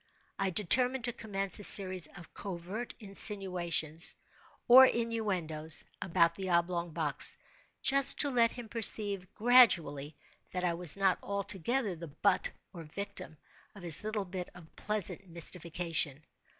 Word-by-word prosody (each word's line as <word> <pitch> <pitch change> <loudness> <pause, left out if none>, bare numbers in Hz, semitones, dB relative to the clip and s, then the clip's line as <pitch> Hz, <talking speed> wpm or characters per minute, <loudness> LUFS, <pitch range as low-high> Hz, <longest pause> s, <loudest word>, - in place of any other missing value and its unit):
I 195 - 0
determined 245 +8 +2
to 240 0 -2
commence 195 -4 -4
a - - -9
series 185 -3 +6
of 175 - -14
covert 195 +5 -7
insinuations, 180 -6 0 0.5
or 255 +2 +9
innuendoes, 185 -11 -2 0.2
about 170 -2 +1
the 190 +1 -7
oblong 170 0 -1
box—just 170 - 0
to 285 - +1
let 235 -2 +2
him 240 -2 -9
perceive, 205 -4 +1
gradually, 170 - +3 0.4
that 180 0 -4
I 175 -1 0
was 170 0 +1
not 195 -2 +1
altogether 200 +2 -3
the 170 +1 -10
butt, 185 +6 -1 0.2
or 170 - -9
victim, 160 -1 -7 0.4
of 200 - -13
his 170 +1 +5
little 215 -2 -4
bit 180 -1 -7
of 165 -2 -16
pleasant 205 -2 -4
mystification. 165 -3 -2
185 Hz, 130 wpm, -30 LUFS, 170-215 Hz, 0.5 s, or